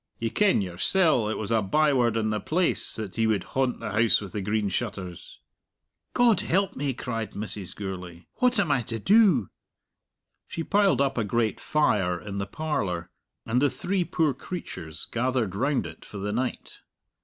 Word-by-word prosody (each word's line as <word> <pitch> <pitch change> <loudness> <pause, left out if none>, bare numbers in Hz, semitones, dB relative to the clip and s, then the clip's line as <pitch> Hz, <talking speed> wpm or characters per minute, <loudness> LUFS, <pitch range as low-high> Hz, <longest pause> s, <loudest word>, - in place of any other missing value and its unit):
"Ye 115 -1 -2
ken 205 - +3
yoursell 115 - +2
it 110 - -2
was 110 0 -3
a 115 -1 +3
byword 125 0 +2
in 110 -1 0
the 105 - -1
place 170 - 0
that 105 -4 -6
he 115 -1 +2
would 105 -4 +1
haunt 130 -2 -1
the 110 - -5
House 110 +2 +4
with 100 -3 -8
the 105 - -3
Green 105 +1 0
Shutters." 95 -4 -5 0.8
"God 235 -6 +5
help 195 -1 +1
me!" 140 0 -1
cried 115 -3 -4
Mrs. 100 -2 -3
Gourlay; 90 -3 -7
"what 250 -2 +3
am 175 -7 +2
I 135 -3 +3
to 115 0 -4
do?" 190 - +4 1.0
She 165 - -4
piled 200 -4 +3
up 135 -3 +1
a - - +1
great 110 +1 0
fire 95 - +1
in 100 0 -6
the 100 - -3
parlour, 100 - -3 0.3
and 120 +3 +1
the 145 - +4
three 190 +4 -1
poor 160 -4 +1
creatures 95 - -6
gathered 120 -4 -1
round 135 0 0
it 80 0 -10
for 105 - -10
the 100 +1 -3
night. 125 +2 -3
115 Hz, 180 wpm, -26 LUFS, 100-150 Hz, 1.0 s, God